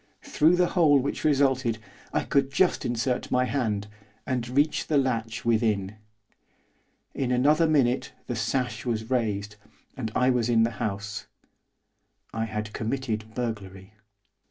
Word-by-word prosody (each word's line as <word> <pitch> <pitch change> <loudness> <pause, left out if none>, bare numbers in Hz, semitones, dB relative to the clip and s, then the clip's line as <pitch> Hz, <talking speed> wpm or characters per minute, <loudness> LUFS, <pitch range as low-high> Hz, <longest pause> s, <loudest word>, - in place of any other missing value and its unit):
Through 160 +4 +3
the 180 0 +2
hole 155 -6 +5
which 135 +1 -2
resulted, 135 -5 +2 0.3
I - - 0
could 140 -2 +1
just 180 +5 +2
insert 120 +1 -1
my 125 0 +2
hand, 110 -7 -1 0.4
and 125 -2 -2
reach 145 +4 +1
the 150 - +2
latch 115 -4 -1
within. 110 -3 +1 1.2
In 130 -2 -1
another 150 +6 +4
minute 135 -5 +2
the 120 - -3
sash 120 +2 -1
was 115 -1 -3
raised, 105 -4 -1 0.4
and 115 -5 -4
I 125 +1 +4
was 120 -2 +1
in 115 -1 +4
the 115 - +1
house, 105 +1 -3 1.1
I 115 0 -1
had 105 -1 -5
committed 110 -2 -3
burglary. 100 -5 -5
120 Hz, 135 wpm, -26 LUFS, 110-135 Hz, 1.2 s, hole